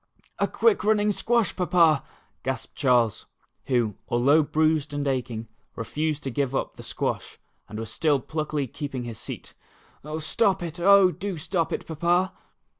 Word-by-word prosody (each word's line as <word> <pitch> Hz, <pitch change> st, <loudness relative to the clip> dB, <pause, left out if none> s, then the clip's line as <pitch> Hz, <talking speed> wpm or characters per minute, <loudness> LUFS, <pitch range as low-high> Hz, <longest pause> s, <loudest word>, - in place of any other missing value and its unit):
"A -, -, +2 dB
quick 450 Hz, -3 st, +2 dB
running 210 Hz, 0 st, +3 dB
squash. 235 Hz, +2 st, +1 dB
Papa," 170 Hz, -5 st, +3 dB, 0.4 s
gasped -, -, -4 dB
Charles, 120 Hz, -6 st, +2 dB, 0.4 s
who. 120 Hz, -5 st, +1 dB, 0.2 s
although 140 Hz, +6 st, +4 dB
bruised 155 Hz, -1 st, +1 dB
and 145 Hz, 0 st, -1 dB
aching, 120 Hz, -4 st, -2 dB, 0.3 s
re -, -, -4 dB
fused 150 Hz, +4 st, -2 dB
to 135 Hz, -, -3 dB
give 135 Hz, +1 st, -1 dB
up -, -, -2 dB
the -, -, -10 dB
squash, -, -, -3 dB, 0.3 s
and 105 Hz, -, -7 dB
was 110 Hz, 0 st, -5 dB
still 150 Hz, -4 st, +2 dB
pluckily 150 Hz, +1 st, -2 dB
keeping 135 Hz, 0 st, -5 dB
his 115 Hz, -3 st, -7 dB
seat -, -, -8 dB, 0.6 s
"Stop 190 Hz, +4 st, +1 dB
it, 170 Hz, 0 st, -6 dB
oh, 195 Hz, +1 st, +6 dB
do 195 Hz, 0 st, -4 dB
stop 165 Hz, +2 st, -1 dB
it -, -, -3 dB
Papa." 175 Hz, +4 st, +1 dB
155 Hz, 155 wpm, -26 LUFS, 130-180 Hz, 0.6 s, oh